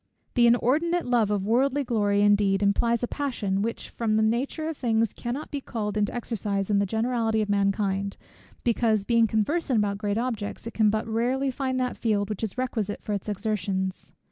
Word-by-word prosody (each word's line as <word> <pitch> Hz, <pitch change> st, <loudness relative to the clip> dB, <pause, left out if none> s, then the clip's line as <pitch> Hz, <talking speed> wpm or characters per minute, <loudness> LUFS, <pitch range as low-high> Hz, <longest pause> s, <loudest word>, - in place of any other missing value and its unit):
The 240 Hz, -2 st, +5 dB
inordinate 310 Hz, +9 st, +2 dB
love 240 Hz, -4 st, +2 dB
of 205 Hz, -2 st, 0 dB
worldly 270 Hz, +6 st, +2 dB
glory 205 Hz, -5 st, +1 dB
indeed, 205 Hz, -1 st, +3 dB
implies 230 Hz, +4 st, +2 dB
a -, -, +1 dB
passion, 225 Hz, -10 st, -2 dB
which 230 Hz, +2 st, -3 dB
from 220 Hz, -2 st, 0 dB
the 220 Hz, -, +3 dB
nature 255 Hz, +8 st, 0 dB
of 320 Hz, -, -3 dB
things 225 Hz, -4 st, +1 dB
cannot 255 Hz, +5 st, -5 dB
be 285 Hz, -, -3 dB
called 210 Hz, -5 st, -4 dB
into 210 Hz, -1 st, +1 dB
exercise 210 Hz, -4 st, -2 dB
in 200 Hz, -, +3 dB
the 200 Hz, -, +1 dB
generality 225 Hz, +1 st, 0 dB
of 205 Hz, -, -6 dB
mankind, 200 Hz, -1 st, 0 dB, 0.5 s
because, 225 Hz, -3 st, +2 dB
being 230 Hz, 0 st, +4 dB
conversant 255 Hz, +5 st, 0 dB
about 200 Hz, -1 st, 0 dB
great 205 Hz, -1 st, -1 dB
objects, 230 Hz, -4 st, -3 dB
it 230 Hz, -, -6 dB
can 215 Hz, -2 st, +3 dB
but 215 Hz, +1 st, -1 dB
rarely 250 Hz, +4 st, 0 dB
find 260 Hz, 0 st, -2 dB
that 250 Hz, -1 st, -1 dB
field 210 Hz, -2 st, 0 dB
which 210 Hz, -, -4 dB
is 220 Hz, +2 st, -3 dB
requisite 225 Hz, -5 st, -2 dB
for 210 Hz, -, -3 dB
its 200 Hz, +1 st, -3 dB
exertions. 200 Hz, -2 st, -2 dB
220 Hz, 190 wpm, -26 LUFS, 205-245 Hz, 0.5 s, The